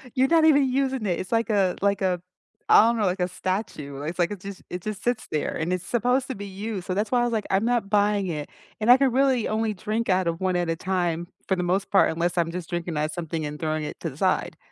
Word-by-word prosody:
You're 260 +1 +3
not 330 -1 +5
even 285 -4 +5
using 265 -3 0
it. 175 -4 0
It's 185 - -6
like 230 +1 +1
a 195 -4 +2
like 200 0 +1
a 180 -2 0 0.5
I - - +9
don't 235 0 +1
know, 215 - +1
like 185 0 0
a 180 - +1
statue, 180 -7 -4
it's 155 +4 -4
like 175 +1 +1
a - - -2
just 195 +1 -9
it 180 - -5
just 210 +1 -5
sits 240 -2 -1
there, 155 - -1
and 165 +2 -2
it's 185 0 -2
supposed 250 +3 +1
to 260 - -4
be 200 0 -7
used, 195 -1 -5
so 185 - -1
that's 205 +2 -1
why 250 - +3
I - - +2
was 240 - 0
like, 215 -2 -1
"I'm 195 +2 +2
not 235 -4 0
buying 205 -1 +2
it, 150 -4 -4 0.3
and 215 - +1
I 250 - +9
can 270 -1 +2
really 260 -2 +2
only 220 0 0
drink 215 +4 -2
out 185 0 +3
of 170 +1 -2
one 185 -1 +1
at 175 -1 0
a 165 - +1
time, 175 -1 -1 0.2
for 190 - +2
the 180 - -2
most 185 +3 -1
part, 195 - +5
unless 170 +2 -1
I'm 165 -1 0
just 175 -1 -5
drinking 175 -2 -3
out 155 +1 0
something 165 -2 -4
and 150 0 -6
throwing 155 -1 -1
it 150 - -6
to - - -3
the - - -12
side." - - 0
195 Hz, 275 wpm, -25 LUFS, 175-225 Hz, 0.5 s, I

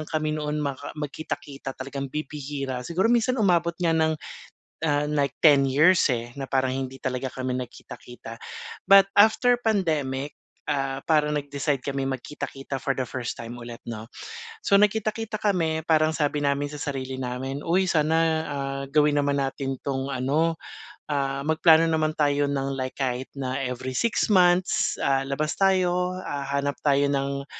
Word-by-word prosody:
ang 155 - -7
kami 155 -1 -1
noon 150 0 -2
maka 140 -2 -4
magkita-kita, 145 -2 -6
talagang 135 +1 -5
bibihira. 140 -2 -4
Siguro 185 - +1
minsan 240 +2 +2
umabot 170 -6 +2
nga 170 -2 +1
ng, 160 -1 +2 0.7
ah, 145 -1 +1
nag-ten 145 0 +4
years 155 +2 +5
eh, 120 0 -3
na 135 -1 -6
parang 130 -1 +1
hindi 135 0 -4
talaga 130 0 -3
kami 130 -1 -3
nagkita-kita. 120 -2 -8 0.5
But, 195 0 +9
after 220 +4 +5
pandemic, 150 -10 0 0.3
ah, 135 -2 -1
parang 150 -2 +2
nag-decide 140 -1 -2
kaming 135 -1 -2
magkita-kita 135 +1 -6
for 135 - 0
the - - +1
first 120 -1 -4
time 115 +1 -7
ulit, 120 -1 -9
'no. 110 -1 -6 0.6
So 200 - +3
nagkita-kita 215 +1 +1
kami 170 -7 +1
parang 155 -1 +4
sabi 150 -1 -1
namin 140 0 +1
sa 145 - -9
sarili 135 -2 -4
namin, 130 +2 -4
"Uy 185 +3 +2
sana, 160 -1 +2 0.3
ah, 135 -1 -3
gawin 150 -1 +4
naman 145 0 +1
natin 135 -1 -2
'tong 135 0 -2
ano, 150 +6 0 0.5
ah, 140 -1 -1
magplano 160 +1 +5
naman 155 -1 0
tayo 145 -1 +2
ng 135 -1 -1
like 130 -1 -4
kahit 130 -1 -2
na 130 0 -2
every 130 0 -4
six 235 - +1
months, 180 -1 +3
ah, 135 -1 +2
labas 155 +2 -1
tayo. 185 -1 +2
Ah, 140 -1 -3
hanap 140 -1 -1
tayo 140 -1 +3
ng, 140 0 -1
145 Hz, 155 wpm, -25 LUFS, 135-160 Hz, 0.7 s, But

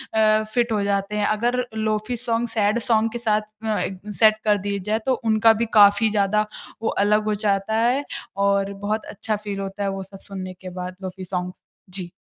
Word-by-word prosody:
अ, 215 0 +4
fit 240 -2 +1
हो 210 - +1
जाते 200 +1 -1
हैं। 210 - +1
अगर 240 +4 +1 0.2
लोफी 215 +2 -1
सॉन्ग 235 0 -1
सैड 215 0 +1
सॉन्ग 225 -1 +2
के - - -4
साथ 215 -2 +2 0.2
अ, 215 -1 +1
एक 190 - -2
द 210 - -6
सेट 215 0 +6
कर 210 -1 +4
दिए 200 0 -1
जाए 220 +1 +2
तो 265 - +3 0.2
उनका 220 +1 +6
भी - - +1
काफ़ी 210 +1 +6
ज़्यादा 210 +1 +2 0.4
वो 225 - 0 0.2
अलग 210 +1 +3
हो 215 - +1
जाता 200 +2 +1
है 245 +5 +2 0.4
और 200 0 +1
बहुत 215 +1 -1
अच्छा 215 +1 -2
फील 205 -1 -5
होता 195 +1 -4
है 195 - 0
वो - - -5
सब 195 +1 -13
सुनने 185 -1 -5
के 185 - -7
बाद 180 0 -5
लोफी 185 0 -6
सॉन्ग्स। 180 0 -3 0.4
जी। 180 -3 -4
210 Hz, 210 wpm, -23 LUFS, 200-220 Hz, 0.4 s, सेट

